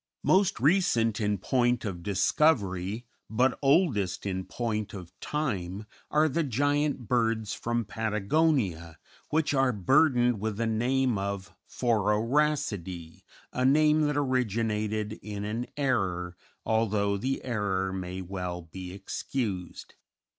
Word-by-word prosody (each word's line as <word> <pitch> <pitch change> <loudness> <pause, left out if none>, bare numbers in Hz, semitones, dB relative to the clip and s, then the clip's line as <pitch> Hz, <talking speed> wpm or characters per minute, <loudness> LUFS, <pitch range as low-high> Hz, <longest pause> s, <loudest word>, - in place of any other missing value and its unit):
Most 195 +1 +3
recent 120 - +3
in 105 -1 +1
point 120 +4 +1
of 90 -4 -4
discovery, 100 - +1 0.2
but 125 +4 +2
oldest 135 - +2
in 95 -1 -2
point 110 -4 -3
of 90 -3 -9
time, 105 - -3 0.2
are 155 +1 +3
the 155 +3 0
giant 145 -1 0
birds 115 -3 +1
from 120 -1 -2
Patagonia, 105 - 0 0.3
which 155 -1 +1
are 135 -2 +3
burdened 125 - +3
with 110 0 -3
the 115 - 0
name 120 +1 +1
of 100 0 -4 0.2
Phororhacidæ, 110 - 0 0.3
a 125 - -1
name 150 +3 +4
that 145 -1 -1
originated 110 -5 -1
in 105 -1 -5
an 115 +4 -3
error, 95 -11 0 0.3
although 105 -2 +1
the 130 +7 -2
error 95 -5 -1
may 95 0 -5
well 90 -1 -5
be 90 +2 -8
excused. 95 -1 -4
110 Hz, 120 wpm, -28 LUFS, 95-130 Hz, 0.3 s, name